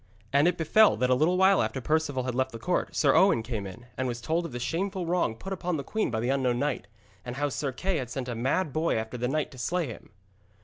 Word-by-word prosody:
And 140 +4 +5
it 180 - +1
befell 210 +7 +5
that 125 0 +1
a - - +7
little 160 +8 +2
while 190 +1 +5
after 135 - -2
Perceval 145 -1 0
had 125 0 -2
left 130 +1 0
the 115 - -7
court, 115 - -1
Sir - - +4
Owen 115 - +4
came 110 -5 -4
in, 110 +6 -11
and 130 +3 -1
was 120 -1 -3
told 165 +8 -1
of - - -12
the 120 - -5
shameful 185 +7 -2
wrong 170 -9 0
put 195 +12 -6
upon 180 -2 -2
the 140 - -4
queen 220 +9 -1
by 110 -2 -2
the 120 +3 -1
unknown 130 -3 +1
knight, 140 -6 -2 0.4
and 125 0 -6
how 145 +2 0
Sir 140 0 -2
Kay 185 +7 -1
had 125 -5 -4
sent 125 +1 -4
a 120 - -3
mad 135 +7 0
boy 160 +3 +1
after 110 +2 -3
the 125 0 -1
knight 150 +3 -1
to 130 - -12
slay 175 +6 0
him. 120 - -9
135 Hz, 265 wpm, -28 LUFS, 120-170 Hz, 0.4 s, a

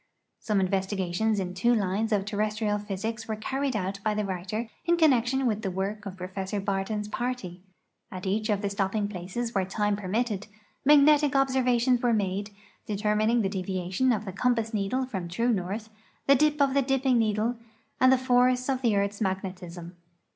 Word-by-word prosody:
Some 210 -3 0
investigations 195 +2 0
in 180 -1 -3
two 235 +6 +2
lines 210 +2 0
of 200 -2 +1
terrestrial 210 0 -1
])hysics 210 +2 -4
were 220 - -2
carried 265 +4 -2
out 195 -1 -2
by 215 -1 +1
the 210 0 -1
writer 195 +5 -3 0.2
in 345 0 +3
connection 265 -4 +3
with 215 -3 0
the 195 - -2
work 200 +3 -3
of 190 -1 -7
Pro 180 0 -5
fessor 190 +1 -4
Ikirton's 200 +1 -2
party. 210 -6 -4 0.5
At 185 0 -7
each 215 +3 -1
of 205 -1 0
the 200 - 0
stopping 200 +1 0
jtlaces 205 +5 -4
where 195 - +1
time 205 +2 0
permitted, 210 +1 -2 0.4
magnetic 295 0 +5
observations 255 -2 +2
were 240 -1 +2
made, 200 0 -1 0.4
determining 215 +2 +1
the - - +1
deviation 190 +5 -1
of 215 -2 -1
the 190 - -6
compass 225 +1 0
needle 215 +6 0
from 190 -9 -5
true 230 +8 0
north, 210 +1 -2 0.3
the 275 - +6
dip 300 +2 +3
of 275 -2 +3
the 280 - +3
dipping 265 -2 +2
needle, 220 +2 0 0.4
and 255 0 +6
the 265 - +5
force 250 0 +2
of 260 -1 0
the 230 -5 +2
earth's 200 +1 -1
magnetism. 185 -3 -4
210 Hz, 175 wpm, -27 LUFS, 195-245 Hz, 0.5 s, the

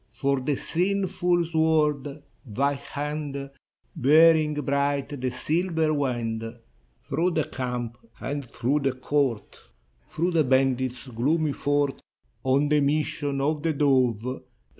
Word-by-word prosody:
For 135 +4 0
the 135 +2 -1
sinful 180 0 0
sword, 150 -3 +1
— - - -39
thy 140 +6 0
hand 145 0 -5 0.4
Bearing 155 +2 +5
bright 140 -1 -1
the 130 - 0
silver 160 +4 0
wand. 120 -6 -1 0.6
Through 175 +2 0
the 155 - +2
camp 125 -3 -4 0.2
and 145 +1 -3
through 130 +3 -1
the 135 -2 0
court, 130 -3 -1 0.5
Through 175 +3 -1
the 165 -2 +3
bandit's 130 -1 +1
gloomy 145 +6 0
fort, 145 -1 0 0.4
On 135 +3 +2
the 150 0 +4
mission 145 -1 0
of 150 +2 0
the 160 0 0
dove. 130 -4 +1
140 Hz, 120 wpm, -26 LUFS, 130-155 Hz, 0.6 s, Bearing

